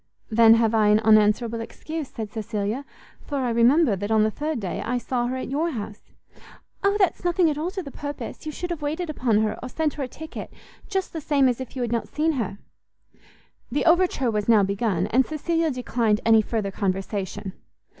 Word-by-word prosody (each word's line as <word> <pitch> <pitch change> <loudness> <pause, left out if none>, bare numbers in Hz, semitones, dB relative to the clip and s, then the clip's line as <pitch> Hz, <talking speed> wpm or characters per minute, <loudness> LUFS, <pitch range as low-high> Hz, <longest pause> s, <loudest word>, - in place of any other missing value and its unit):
"Then 225 0 +7
have 230 -1 +2
I 215 -2 +4
an 210 +1 +5
unanswerable 220 +1 +3
excuse," 310 +6 -6
said 215 -2 -6
Cecilia, 215 +3 -3 0.4
"for 290 - -5
I 255 -3 0
remember 235 +2 +4
that 205 +2 -4
on 220 -1 +4
the 215 - +1
third 300 +2 -3
day 190 -4 -4
I 245 +3 -1
saw 245 0 -1
her 255 +1 -2
at 260 - -4
your 300 +6 0
house." 215 -7 -6 0.8
"O 400 +1 +3
that's 380 -5 +1
nothing 350 -2 +3
at 290 - -4
all 330 +3 -1
to 380 0 -5
the 280 - -8
purpose; 290 +1 -6
you - - -2
should 355 +3 -5
have 335 -3 -4
waited 310 +3 -2
upon 225 -7 +1
her, 215 - -2
or 250 - -6
sent 310 +2 -1
her 290 - -4
a - - -3
ticket, 315 +5 -8 0.4
just 385 -2 -2
the 325 - -4
same 280 -2 +3
as 250 0 0
if 260 - -8
you 255 - -2
had 235 - -2
not 235 -1 -1
seen 315 +2 0
her." 225 -9 -3 1.1
The 290 - 0
overture 335 -7 +3
was 210 0 -2
now 215 -3 +6
begun, 195 -2 0
and 245 +6 +3
Cecilia 325 +3 -1
declined 240 -5 0
any 225 -1 +6
further 215 -2 -2
conversation. 195 0 -3
245 Hz, 205 wpm, -24 LUFS, 215-305 Hz, 1.1 s, Then